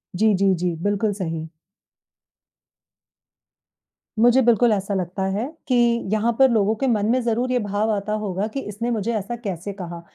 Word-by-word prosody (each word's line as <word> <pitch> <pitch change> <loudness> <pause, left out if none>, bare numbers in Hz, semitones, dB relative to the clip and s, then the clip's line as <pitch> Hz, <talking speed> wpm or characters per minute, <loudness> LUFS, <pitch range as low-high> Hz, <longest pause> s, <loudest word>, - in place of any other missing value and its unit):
जी, 215 +2 +3
जी, 195 0 +3
जी। 175 0 -2
बिल्कुल 205 +1 0
सही। 165 -5 -4 2.7
मुझे 245 +3 +5
बिल्कुल 235 -1 +4
ऐसा 200 0 -2
लगता 185 0 -2
है 210 +5 -1 0.2
कि 255 - +2 0.4
यहाँ 220 +2 +2
पर 265 - +7
लोगों 220 -2 +2
के 270 - +2
मन 215 -4 +1
में 255 - +2
ज़रूर 240 +2 -1
ये 250 - +2
भाव 205 +1 -1
आता 210 0 -2
होगा 195 0 -2
कि 275 - -2
इसने 230 +1 -4
मुझे 230 0 -1
ऐसा 215 +3 -3
कैसे 200 -4 -5
कहा, 175 -3 -7
210 Hz, 165 wpm, -22 LUFS, 195-235 Hz, 2.7 s, पर